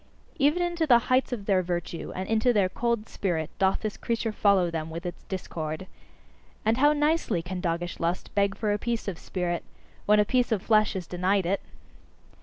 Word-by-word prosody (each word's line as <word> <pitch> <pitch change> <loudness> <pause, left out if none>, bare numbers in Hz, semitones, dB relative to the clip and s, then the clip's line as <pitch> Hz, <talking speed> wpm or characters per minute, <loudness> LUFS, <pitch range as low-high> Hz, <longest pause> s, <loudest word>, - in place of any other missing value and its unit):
Even 300 +6 +3
into 345 -2 0
the 245 -4 +8 0.2
heights 260 +1 +3
of 220 -5 -4
their 195 -3 +3
virtue 175 -1 -4
and 185 +1 -3
into 225 +2 +3
their 200 -5 +2
cold 235 +1 -1
spirit 165 -5 -2
doth 190 -1 +2
this 215 -1 -3
creature 230 -1 -1
follow 200 -5 +3
them, 160 -1 -3
with 165 +2 -6
its 175 -1 -5
discord. 160 -3 -4 0.8
And 225 +2 +3
how 290 +3 +5
nicely 295 - +1
can 180 +1 -5
doggish 175 0 -2
lust 170 +2 -2
beg 200 -1 +1
for 210 -2 0
a 205 - -1
piece 235 -1 -2
of 185 -4 -4
spirit, 175 -2 -2 0.4
when 210 0 +6
a 210 - +4
piece 250 +2 +1
of 210 -4 0
flesh 215 -1 +3
is 185 -2 -3
denied 185 +2 +1
it! 195 +3 0
200 Hz, 195 wpm, -27 LUFS, 175-230 Hz, 0.8 s, the